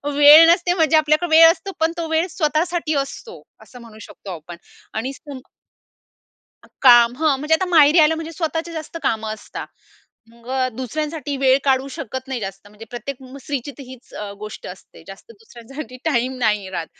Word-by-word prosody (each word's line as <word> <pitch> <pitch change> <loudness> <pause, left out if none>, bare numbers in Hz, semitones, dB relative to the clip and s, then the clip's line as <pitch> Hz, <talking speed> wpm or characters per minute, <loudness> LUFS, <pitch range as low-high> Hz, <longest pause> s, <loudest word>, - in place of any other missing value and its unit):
वेळ 295 +3 +9
नसते 350 0 +1
म्हणजे 320 -3 +3
आपल्याकडे 310 +3 +1
वेळ 330 0 +9
असतो 390 +2 -7
पण 320 +1 +1
तो 335 -1 -3
वेळ 320 +2 +1
स्वतःसाठी 320 0 -1
असतो 280 - -5 0.2
असं 250 -1 -15
म्हणू 220 -2 -14
शकतो 195 - -11
आपण. 170 +1 -10 0.4
आणि 255 +5 -4
स्पुंग 275 -1 -11 1.4
काम 240 -2 +6
हं, 305 -1 +1
म्हणजे 300 +3 +1
आता 345 - 0
माहेरी 310 0 +5
आलं 310 +1 +5
म्हणजे 325 +1 -7
स्वतःची 325 +1 -4
जास्त 320 +1 -8
कामं 220 -1 -2
असतात 215 - -9 0.6
मग 235 +1 -19 0.3
दुसऱ्यांसाठी 295 +3 -4
वेळ 265 0 +3
काढू 265 -1 +1
शकत 260 -2 -7
नाही 260 -3 -4
जास्त, 195 0 -8
म्हणजे 210 +2 -13
प्रत्येक 245 +3 -7
स्त्रीची 275 +1 -6
तर 280 - -8
हीच 255 -1 -14
अ, 210 -1 -6
गोष्ट 215 +1 -9
असते - - -13
जास्त - - -13
दुसऱ्यांसाठी 270 - -11
टाईम 260 -4 0
नाही 210 -5 0
राहत. 170 -3 -4
275 Hz, 170 wpm, -20 LUFS, 240-320 Hz, 1.4 s, वेळ